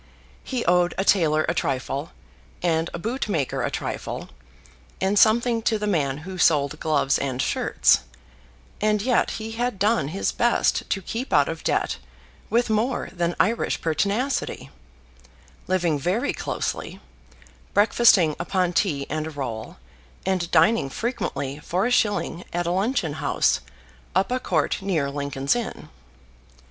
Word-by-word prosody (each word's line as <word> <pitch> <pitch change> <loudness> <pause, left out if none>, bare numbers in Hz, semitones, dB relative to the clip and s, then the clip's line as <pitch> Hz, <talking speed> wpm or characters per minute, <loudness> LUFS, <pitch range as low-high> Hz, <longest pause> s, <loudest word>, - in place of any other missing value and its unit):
He 255 -3 -3
owed 175 -1 +3
a 195 - 0
tailor 155 -6 +3
a - - +1
trifle, 140 0 -2 0.5
and 165 -1 +1
a - - -5
bootmaker 205 - -2
a - - 0
trifle, - - -5 0.7
and 195 +2 +2
something 230 +1 +4
to 220 0 +1
the 210 - -3
man 145 -9 0
who 185 -1 -7
sold 150 -2 +3
gloves 150 -3 +1
and 130 -2 -2
shirts; - - +3 0.8
and 210 0 +2
yet 250 -1 +2
he 220 0 -6
had 240 -1 -2
done 210 -5 +2
his 185 +7 -1
best 240 0 +1
to 195 - -1
keep 235 +9 -4
out - - +4
of - - -5
debt - - 0 0.5
with 240 +1 +2
more 220 +4 0
than 175 -1 -1
Irish 230 +4 +1
pertinacity, 200 - -1 1.0
living 175 -5 +1
very 205 - 0
closely, - - -4 0.8
breakfasting 205 -7 +5
upon 180 0 0
tea 150 -8 +1
and 155 +1 -3
a - - -4
roll, 120 -7 -5 0.5
and 185 -3 0
dining 220 -11 +4
frequently 145 - -3
for 180 +6 -1
a 245 - 0
shilling 205 -6 +1
at 175 0 -1
a 170 - 0
luncheon 195 - 0
house - - +2 0.6
up 190 +4 +2
a 255 - +1
court 170 -5 0
near 160 -8 0
Lincoln's 140 - -1
Inn. 240 -2 -5
185 Hz, 140 wpm, -24 LUFS, 155-220 Hz, 1.0 s, breakfasting